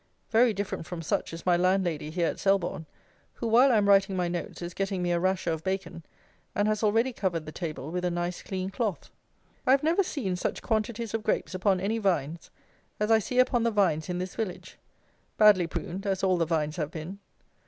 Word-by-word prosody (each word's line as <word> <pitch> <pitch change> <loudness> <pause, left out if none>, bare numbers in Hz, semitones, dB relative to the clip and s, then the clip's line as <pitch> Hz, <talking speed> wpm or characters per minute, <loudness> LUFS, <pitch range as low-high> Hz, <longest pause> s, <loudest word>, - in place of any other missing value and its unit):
Very 230 +1 +5
different 200 -5 -4
from 170 -2 -6
such - - -1
is 165 0 -8
my 180 -1 +4
landlady 180 -4 +1
here 170 +2 0
at - - -2
Selborne, 190 -5 0 0.5
who, - - -5
while 240 +4 +5
I 230 - +4
am 205 -1 +2
writing 195 -1 +4
my 180 -1 0
notes, 175 0 -4
is 175 0 -5
getting 195 -1 -2
me 175 - 0
a 170 - +2
rasher 185 -1 0
of 160 -1 -3
bacon, 190 -3 -3 0.5
and 205 +1 +2
has 215 0 0
already 225 +4 +2
covered 170 -7 -2
the 155 - -7
table 155 -3 -5
with 180 +1 -2
a 180 - +1
nice 175 +1 -3
clean 190 0 -4
cloth. 210 -2 -3 0.6
I - - +2
have 270 +2 +5
never 330 +5 +3
seen 255 - -2
such 180 - -3
quantities 225 0 -1
of 225 - -1
grapes 215 -2 -1
upon 185 0 +1
any 210 +5 -1
vines 170 -5 -1 0.5
as 210 +1 +1
I 225 - +6
see 250 +5 -4
upon 255 -1 +4
the 235 - +2
vines 185 -7 +1
in 180 - -2
this 180 +1 -4
village, 215 -6 -5 0.6
badly 205 -5 +6
pruned 190 +4 -5
as 195 0 -1
all 185 -1 +3
the 165 -2 +1
vines 155 -1 -1
have 150 -3 -2
been. 165 +5 -7
190 Hz, 215 wpm, -28 LUFS, 175-215 Hz, 0.6 s, I